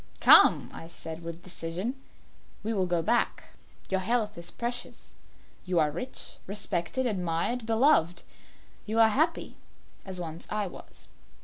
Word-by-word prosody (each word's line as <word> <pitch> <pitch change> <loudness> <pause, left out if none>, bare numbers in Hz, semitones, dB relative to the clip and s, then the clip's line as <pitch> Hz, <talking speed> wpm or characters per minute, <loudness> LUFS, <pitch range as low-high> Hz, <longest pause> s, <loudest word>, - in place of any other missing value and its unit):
"Come," - - +7
I 165 - -9
said, 165 -1 -8
with 170 +1 -8
decision, 180 +6 -4 0.7
"we 225 +2 -1
will 190 -3 +1
go 175 -2 +1
back; 240 +8 0 0.4
your 190 - 0
health 215 +1 0
is 170 0 -3
precious. 240 +1 -5 0.5
You 180 -1 -1
are 155 -2 +3
rich, 255 - -6
respected, 200 +4 -2
admired, 200 +3 -1
beloved; 225 - +3 0.6
you 220 +1 -2
are 225 -1 +7
happy, 315 +9 0 0.5
as 190 -2 -7
once 165 -1 -7
I 210 -1 -1
was. 180 - -11
190 Hz, 135 wpm, -28 LUFS, 170-230 Hz, 0.7 s, Come